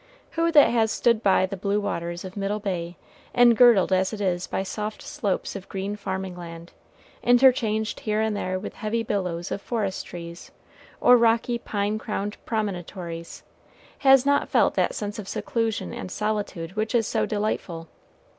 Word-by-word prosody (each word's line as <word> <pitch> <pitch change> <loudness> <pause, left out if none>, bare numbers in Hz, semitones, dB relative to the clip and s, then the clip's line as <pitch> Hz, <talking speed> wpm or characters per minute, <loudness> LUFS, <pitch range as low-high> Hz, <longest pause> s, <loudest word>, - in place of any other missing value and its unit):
Who 335 0 +1
that 295 -2 +7
has 225 -2 +2
stood 235 -1 +2
by 195 -3 +4
the 195 +1 -5
blue 200 +2 0
waters 170 -3 -3
of 185 - -8
Middle 200 +1 -1
Bay, 175 -4 -4 0.4
engirdled 240 -5 +6
as 185 0 +2
it 215 - -5
is 185 -2 -1
by 190 - -2
soft 210 +2 -5
slopes 200 0 -2
of 195 -1 -8
green 195 +1 -3
farming 190 -2 -4
land, 170 -1 -9 0.5
interchanged 240 -3 +3
here 215 -1 -1
and 220 -1 0
there 185 -2 -2
with 185 - -6
heavy 225 0 -2
billows 180 -5 -2
of 200 - -3
forest 205 -5 -3
trees, 170 0 -9 0.5
or 245 - +7
rocky, 235 +1 +2
pine 210 -1 -2
crowned 210 -1 -4
promontories, 180 -5 -4 0.6
has 270 -2 +6
not 285 0 +2
felt - - +3
that - - 0
sense 210 +1 -4
of 200 - -7
seclusion 225 +1 -2
and 240 -6 -6
solitude 205 -5 -3
which 215 +3 -1
is 230 -2 +3
so - - 0
delightful? 205 -6 -3
205 Hz, 165 wpm, -25 LUFS, 185-225 Hz, 0.6 s, that